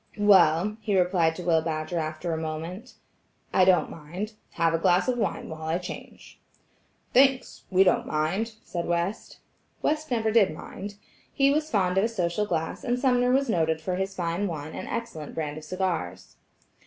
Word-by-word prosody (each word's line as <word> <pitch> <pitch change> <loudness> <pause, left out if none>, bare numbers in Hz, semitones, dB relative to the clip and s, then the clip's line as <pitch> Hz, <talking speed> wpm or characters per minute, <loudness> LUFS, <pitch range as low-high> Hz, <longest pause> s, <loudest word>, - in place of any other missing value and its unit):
"Well," 200 -1 +4
he 205 -3 +1
replied 175 -3 +2
to 180 - -6
Will 165 -2 +3
Badger 160 +1 -2
after 155 +2 -3
a - - -1
moment, 170 +9 -6 0.6
"I 185 - +5
don't 180 -4 +3
mind. 175 +8 -6 0.2
Have 165 0 +2
a 165 - +1
glass 180 +4 +3
of 255 - +2
wine - - -2
while 160 0 -8
I 160 +2 +1
change." 180 0 -9 0.7
"Thanks–we 255 -7 +3
don't 185 - +2
mind," 175 +9 -1
said 170 -1 -4
West. 175 +5 -2 0.4
West 310 0 0
never 225 -3 +1
did 200 -8 +3
mind. 205 +1 -8 0.4
He 275 -1 +3
was 305 +2 0
fond 190 -5 +2
of - - +2
a - - +3
social 205 -2 -1
glass, 165 -4 -2
and 245 -2 0
Sumner 250 -1 +2
was 275 +2 +2
noted 160 -6 +1
for 180 +3 -3
his 190 0 -3
fine 175 +2 -1
wine 155 -3 -5
and - - -6
excellent 230 -11 -5
brand 150 -1 -3
of 155 - -13
cigars. 165 - -3
180 Hz, 175 wpm, -26 LUFS, 160-215 Hz, 0.7 s, I